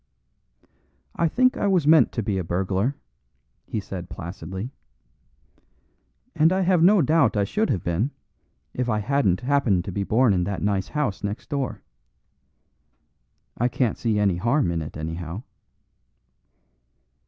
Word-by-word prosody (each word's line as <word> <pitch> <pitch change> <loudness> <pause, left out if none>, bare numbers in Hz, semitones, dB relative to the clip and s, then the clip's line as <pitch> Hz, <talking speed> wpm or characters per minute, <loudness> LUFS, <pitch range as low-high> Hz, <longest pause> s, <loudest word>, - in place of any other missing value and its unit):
"I 170 - +2
think 255 +9 +2
I 205 - 0
was 185 -6 +2
meant 160 +1 +6
to 115 - -2
be 100 -2 -1
a - - -2
burglar," 95 +9 -1 0.7
he 110 - -3
said 90 -3 -7
placidly, 95 +6 -7 1.6
"and 160 +2 +4
I 190 +1 +1
have 180 -2 +3
no 190 +1 +6
doubt 140 -6 +3
I 100 - +3
should 215 - 0
have 90 - -1
been 90 +10 0 0.6
if 125 -1 -2
I 110 - +1
hadn't 105 -4 +1
happened 125 -9 +1
to 100 - -4
be 100 - -3
born 115 +2 +3
in 90 -1 +1
that 100 0 -3
nice 100 -2 0
house 145 -11 -2
next 100 +2 -4
door. 140 -3 -3 1.8
I 120 - +3
can't 125 -2 0
see 110 -3 -1
any 100 -4 +2
harm 115 - +1
in 85 -1 -2
it, 75 - -7
anyhow." 80 +5 -5
105 Hz, 145 wpm, -24 LUFS, 95-140 Hz, 1.8 s, meant